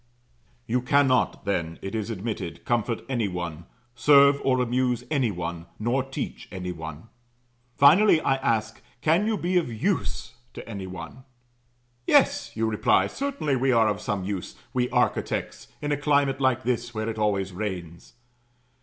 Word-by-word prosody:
You 125 +2 0
cannot, 130 -3 +2
then, 85 -5 -2
it 95 - -5
is 110 -1 -3
admitted, 105 -5 -5
comfort 115 -1 0
any 120 -5 0
one, 85 -2 -5 0.3
serve 140 +3 +5
or 130 -1 +2
amuse 125 0 0
any 135 -6 +2
one, 85 -2 -5
nor 120 +5 0
teach 135 +1 -6
any 90 -2 -4
one. 80 +3 -8 0.7
Finally, 160 +6 +6
I 135 -3 +1
ask, 115 -5 -1 0.2
Can 170 +7 +3
you 220 -1 +1
be 180 0 0
of 165 -8 0
Use 110 - -2 0.2
to - - -9
any 100 -4 -6
one? 90 +8 -9 0.8
"Yes," - - +3
you 110 0 0
reply; 110 -1 +3
"certainly 275 - -2
we 130 +1 +2
are 115 -2 +4
of 105 -2 -1
some 100 -2 -2
use 95 -1 -4 0.2
we 125 -1 +1
architects - - -1 0.2
in 145 - -1
a 145 - +1
climate 140 -2 +1
like 130 -1 +2
this, 120 -1 -2
where 110 0 -2
it 110 -1 -4
always 100 -3 0
rains." 90 -4 -6
115 Hz, 155 wpm, -25 LUFS, 100-135 Hz, 0.8 s, Finally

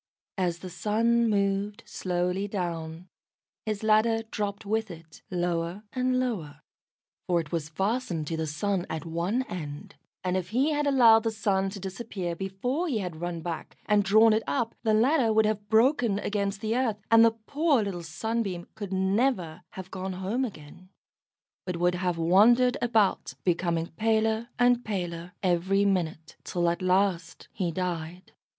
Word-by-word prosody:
As 175 -2 0
the 185 +1 -8
sun 225 +5 +2
moved 200 0 0
slowly 180 +2 -2
down, 170 -3 -4 0.6
his 215 -1 -2
ladder 220 +1 +3
dropped 210 -1 -4
with 220 +1 -1
it 165 -2 -12
lower 175 +1 -2
and 255 0 +1
lower, 165 - -3 0.7
for 175 -1 +2
it 160 -3 -6
was 160 -3 -2
fastened 190 -1 -1
to 165 - -3
the 160 0 -2
Sun 180 +5 -1
at 160 -1 -4
one 175 +10 -1
end; 150 - -7 0.3
and 185 0 0
if 180 -1 -2
he 265 +7 +2
had 295 -1 0
allowed 235 -5 +6
the 225 - 0
Sun 200 -3 0
to 200 +1 -8
disappear 190 -2 -5
before 195 - -2
he 265 -8 0
had 180 -5 -5
run 175 -1 -3
back 165 -1 -6
and 210 -1 +3
drawn 215 +3 +6
it 220 - +2
up, 230 -1 -1
the 220 -2 +2
ladder 245 +1 +3
would 220 0 +4
have 210 -1 -2
broken 235 -1 +3
against 200 -1 -2
the 220 0 -1
earth, 245 -5 +1
and 225 0 +8
the 225 0 +3
poor 290 -4 +2
little 190 -4 -4
Sunbeam 190 +2 -3
could 205 -3 -7
never 190 -3 0
have 190 0 -8
gone 190 0 -4
home 190 +8 -2
again, 185 - -8 0.7
but 180 -2 -4
would 175 +1 +2
have 180 -1 -1
wandered 225 +9 +5
about, 225 -5 +1
becoming 170 -2 0
paler 220 +5 0
and 245 0 +3
paler 175 -4 -4
every 190 +2 +2
minute, 165 -5 -1
till 175 -1 -1
at 170 - -4
last 185 -2 0
he 185 -4 -1
died. 175 0 -4
195 Hz, 160 wpm, -27 LUFS, 175-225 Hz, 0.7 s, and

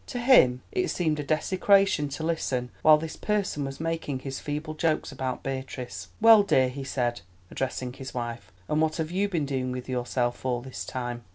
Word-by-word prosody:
To 245 - -5
him 235 - +5
it 370 -1 0
seemed 155 -4 0
a - - -2
desecration 185 +1 +2
to 145 +3 -5
listen 130 -7 -1
while 155 -1 +7
this 160 +1 -6
person 200 -9 -1
was 135 0 -6
making 160 -5 -3
his 135 -1 -5
feeble 150 +1 -4
jokes 155 -1 0
about 130 -2 -4
Beatrice. 130 -8 -5
"Well, 225 -1 +8
dear," 130 -10 +3
he 135 +2 -6
said, 125 -3 -1 0.3
addressing 130 -1 -3
his 135 0 -8
wife, 120 -1 -5 0.2
"and 150 +1 +1
what 160 0 +1
have 160 -1 -3
you 200 +3 0
been 165 -6 -1
doing 130 -2 -2
with 125 0 -5
yourself 125 -1 -1
all 125 -2 -1
this 130 +1 -7
time?" 120 -2 -4
140 Hz, 190 wpm, -27 LUFS, 125-160 Hz, 0.3 s, Well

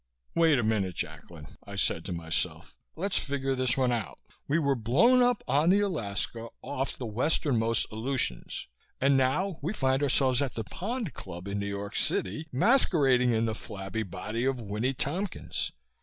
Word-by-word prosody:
Wait 165 -4 +4
a 120 - +1
minute, 100 -5 0
Jacklin, 80 0 -6 0.2
I 100 - -9
said 80 -4 0
to - - -4
myself. 80 -1 -3 0.2
Let's 190 +4 0
figure 135 -1 -1
this 130 -1 +1
one 130 -2 +3
out. 115 -4 -2 0.3
We 150 - +2
were 140 -4 +2
blown 145 - +4
up 245 -2 +3
on 145 +6 +3
the 200 +2 +5
Alaska, 115 - -2 0.2
off 135 -1 -3
the 125 - -5
westernmost 115 -1 +1
Aleutians, 110 - -2 0.3
and 135 +1 +4
now 155 +8 +1
we 165 +8 -1
find 130 -6 +1
ourselves 130 -2 +3
at 135 -4 -2
the 115 - -2
Pond 215 - -4
Club, 85 +3 -8
in 100 0 -2
New 100 - -2
York 100 0 -4
City, 110 - 0
masquerading 135 - +4
in 115 0 +2
the 110 - 0
flabby 100 0 -5
body 105 +4 -4
of 135 -1 +1
Winnie 110 +5 -1
Tompkins. 175 +10 -2
130 Hz, 170 wpm, -29 LUFS, 110-150 Hz, 0.3 s, the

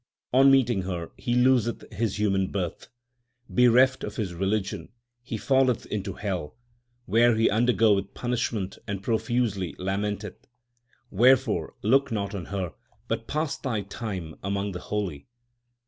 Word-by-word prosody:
On 135 +2 +7
meeting 125 -6 +4
her 90 -3 -4
he 120 - -2
loseth 125 -2 +2
his 105 -1 -1
human 95 -3 +1
birth. 90 -4 -4 0.6
Bereft 125 +2 +4
of 105 - -5
his 100 -5 -3
religion 95 +3 -2 0.3
he 120 -2 -5
falleth 130 0 +2
into 100 -3 -4
hell, 95 -4 -4 0.5
where 115 +3 +4
he 110 +1 +3
undergoeth 110 -3 +2
punishment 115 -5 -2
and 100 -1 -4
profusely 110 -5 -1
lamenteth. 100 +2 -3 0.6
Wherefore 120 - +3
look 135 +5 +3
not 100 -2 -2
on 95 -4 -5
her, 95 -4 -4 0.3
but - - -3
pass 155 0 -2
thy 120 -6 -2
time 100 -5 -6
among 100 +1 -1
the 90 - -5
holy. 95 -9 -4
105 Hz, 130 wpm, -26 LUFS, 95-120 Hz, 0.6 s, On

